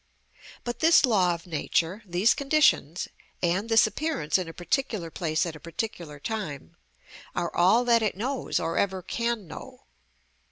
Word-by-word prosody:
But 240 0 -4
this 325 -2 +6
law 185 -8 +3
of 165 - -12
nature, 170 +3 -1
these 180 +6 +3
conditions, 275 - +2 0.4
and 185 +6 +1
this 225 -1 +6
appearance 270 - -1
in 180 - -4
a - - -6
particular 200 -2 -2
place 160 -2 -1
at 165 -2 -5
a - - -10
particular 170 -3 -6
time, 150 - -5 0.6
are 170 - -2
all 210 +8 +4
that 235 -1 +4
it 215 -3 -1
knows 260 +5 -1
or 165 -1 -1
ever 190 -2 -1
can 235 +1 -2
know. 255 - -10
190 Hz, 155 wpm, -27 LUFS, 170-235 Hz, 0.6 s, this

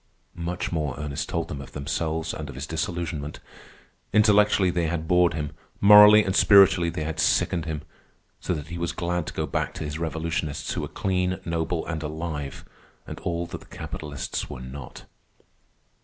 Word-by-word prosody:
Much 85 +1 -4
more 75 -6 -2
Ernest 75 -1 -4
told 85 -1 -2
them 70 -3 -6
of 70 - -11
themselves 80 +3 -2
and 75 -2 -6
of 70 - -8
his 65 +3 -5
disillusionment. 80 -2 -4 0.7
Intellectually 105 -3 +4
they 85 -1 0
had 80 -1 -3
bored 90 0 +4
him; 75 -2 -3 0.3
morally 105 +1 +9
and 95 -1 -1
spiritually 95 -5 +6
they 80 - -4
had 80 +1 -4
sickened 80 +1 +2
him; 80 -3 -4 0.6
so 90 - -2
that 75 0 -7
he 85 0 -5
was 85 0 -2
glad 85 -1 -2
to - - -5
go - - -1
back - - -2
to - - -5
his 75 +1 -4
revolutionists, 80 -2 -2
who - - -2
were - - -3
clean, 90 -1 -1
noble, 85 0 -1
and 80 -2 -4
alive, 75 -2 -5 0.4
and - - -8
all 85 0 -2
that 85 - -8
the - - -16
capitalists 75 -2 -5
were 65 - -7
not. 65 +1 -9
80 Hz, 175 wpm, -25 LUFS, 75-90 Hz, 0.7 s, morally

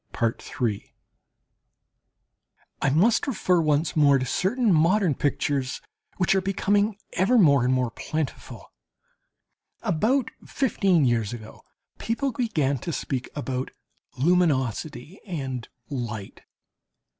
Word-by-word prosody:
I - - +2
must 210 - +3
refer 185 -9 +2
once 155 0 +1
more 145 -3 +5
to 130 - -2
certain 205 - +1
modern 170 +2 +3
pictures, 140 -1 -1 0.4
which 185 - +2
are 190 - +2
becoming 200 +2 +1 0.2
ever 200 +8 +3
more 140 - +5
and 125 - +2
more 125 -2 +1
plentiful. 155 +3 -5 1.1
About 225 - +1
fifteen 195 - +1
years 115 -3 +1
ago 110 -2 -10 0.4
people 265 +4 -1
began 155 - 0
to 170 - -4
speak 135 -4 -3
about 130 -3 -3 0.5
"luminosity" 150 - 0
and 135 -9 -4 0.2
"light." 115 -8 -5
155 Hz, 100 wpm, -25 LUFS, 130-195 Hz, 1.1 s, more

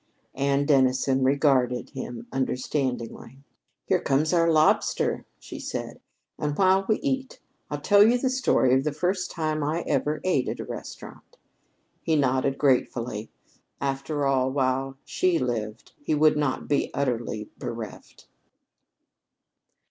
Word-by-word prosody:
Anne 140 +1 +1
Dennison 130 -1 +3
regarded 130 -3 +2
him 120 -2 -7
understandingly. 130 -2 -3 0.5
"Here - - +1
comes 150 +5 +1
our 170 -1 +4
lobster," 155 -1 +2
she - - -9
said, - - -5 0.4
"and 150 -1 -2
while 190 0 +3
we 215 - +4
eat 265 -2 -2
it, - - -29 0.3
I'll - - -4
tell 205 -1 +5
you 235 +3 +4
the 255 +1 0
story 255 - +2
of 130 +1 +3
the 150 -1 -1
first 180 +4 -1
time 155 -2 -2
I 155 +4 -1
ever 150 +1 -1
ate 160 -9 +1
at - - -5
a - - -5
restaurant." - - -10 0.6
He 160 - +1
nodded 135 -1 +1
gratefully. 120 -5 0 0.5
After 140 +2 -2
all, 130 -1 +2
while 135 0 -1
she 180 -2 +1
lived, 115 -5 -3
he 150 - 0
could 155 0 +5
not 145 -3 -1
be 145 - +1
utterly 120 -5 -2
bereft. 115 -3 -8
140 Hz, 135 wpm, -26 LUFS, 130-155 Hz, 0.6 s, tell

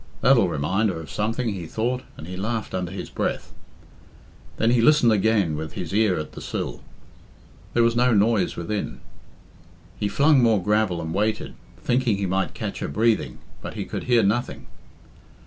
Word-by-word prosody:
"That'll 120 -7 +5
remind 90 +8 0
her 85 - -3
of 80 -3 -9
something," 115 +5 -1
he 95 -5 -5
thought, 120 +7 -1 0.2
and 75 - -8
he 90 +2 -7
laughed 110 +4 -3
under 90 -2 -2
his 95 - -7
breath. - - -3 1.0
Then 115 +1 +2
he 120 -1 +3
listened 125 -2 +5
again 100 -6 +2
with 80 0 -5
his - - -5
ear 105 -3 +3
at 75 -1 -5
the - - -10
sill. - - -4 0.9
There 120 - +5
was 115 0 +2
no 125 +1 +3
noise 105 -2 +2
within. 100 +5 -4 1.0
He 105 - 0
flung 140 +6 +4
more 115 -3 +4
gravel 105 -4 +1
and 80 0 -4
waited, 105 +3 -1 0.2
thinking 120 -4 +1
he 100 - -1
might 95 +1 -1
catch - - -4
her - - -3
breathing, 105 - +1 0.2
but - - -7
he - - -4
could - - -5
hear 120 -3 +4
nothing. 110 +5 -1
105 Hz, 175 wpm, -24 LUFS, 90-115 Hz, 1.0 s, That'll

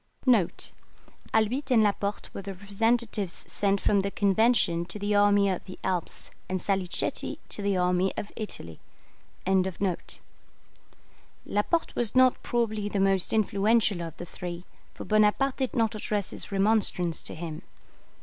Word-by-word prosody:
[Albitte 240 +6 +1
and 235 -4 +5
Laporte 200 0 -1
were - - -5
the 195 0 -7
representatives 205 0 -1
sent 200 -1 +1
from 200 - +2
the 195 +1 0
Convention 200 -4 +2
to 180 - -5
the 205 0 -1
army 205 0 +4
of 185 -2 -2
the 185 - -9
Alps, 180 -3 -2 0.2
and 185 0 -1
Salicetti 190 -1 0
to - - -3
the 200 -1 +1
army 180 +1 +2
of 205 - -5
Italy.] 85 - -7 2.7
Laporte 265 +12 0
was 235 -1 0
not 255 -1 +5
probably 220 -3 -1
the 205 - -2
most 195 -1 +2
influential 210 -2 +2
of 165 -1 -7
the 175 - -7
three, 175 0 -7 0.3
for - - -8
Bonaparte 215 +5 +2
did 260 -2 -2
not 225 -2 +2
address 210 -2 -2
his - - -6
remonstrance 195 -4 +2
to - - -5
him. 160 -1 -6
200 Hz, 140 wpm, -27 LUFS, 185-220 Hz, 2.7 s, and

